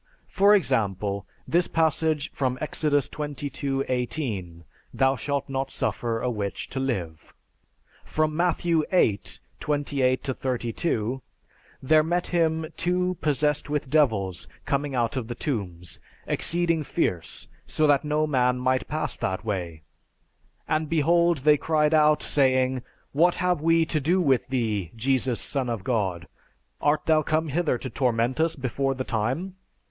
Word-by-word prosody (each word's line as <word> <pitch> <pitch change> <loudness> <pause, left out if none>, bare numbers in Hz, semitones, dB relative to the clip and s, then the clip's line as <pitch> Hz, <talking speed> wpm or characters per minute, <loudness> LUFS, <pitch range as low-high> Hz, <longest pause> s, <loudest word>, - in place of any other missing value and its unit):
For 200 +1 +5
example, 100 - 0 0.2
this 175 +1 +2
passage 160 -2 +1
from 130 -2 -1
Exodus 145 -2 0
XXII 140 -2 -3
18, 115 - -3 0.3
"Thou 135 0 +2
shalt 140 +3 -2
not 135 0 -2
suffer 115 -1 -2
a 125 - 0
witch 100 -4 -4
to 135 - -4
live." 90 - -4 0.7
From 155 0 -1
Matthew 170 -1 +1
VIII 110 - +3 0.4
28 140 -3 0
32, 125 -1 -2 0.6
"There 155 +4 +5
met 175 +2 0
him 160 -2 +1
two 180 +1 0
possessed 150 0 +1
with 145 -3 -2
devils 110 - +1 0.2
coming 140 -1 -1
out 120 -1 0
of 120 -4 -3
the 120 - -5
tombs, 95 - -4 0.3
exceeding 170 -1 +1
fierce, 95 - -2 0.2
so 155 - +1
that 145 -2 +4
no 150 +1 +1
man 125 -4 +2
might 130 +1 0
pass 155 +1 -2
by - - -1
that 95 +4 -5
way. 85 -7 -4 0.8
And, 155 0 0
behold, 170 +2 +3
they 150 -1 +6
cried 155 0 +1
out, 150 -1 +4
saying, 130 -2 +2 0.3
'What 170 +5 +3
have 180 -4 0
we 165 0 +3
to 155 -1 0
do 170 +7 +2
with 135 -8 +2
thee, 110 -9 -1
Jesus, 130 0 +1
Son 135 -3 -1
of 115 -5 -3
God? 95 -8 -1 0.5
Art 150 +1 +2
thou 155 -1 +4
come 155 +1 0
hither 155 -2 +1
to 130 - -6
torment 120 +1 0
us 165 0 +2
before 135 0 -1
the 130 - -3
time?' 130 - -2
140 Hz, 140 wpm, -25 LUFS, 120-155 Hz, 0.8 s, they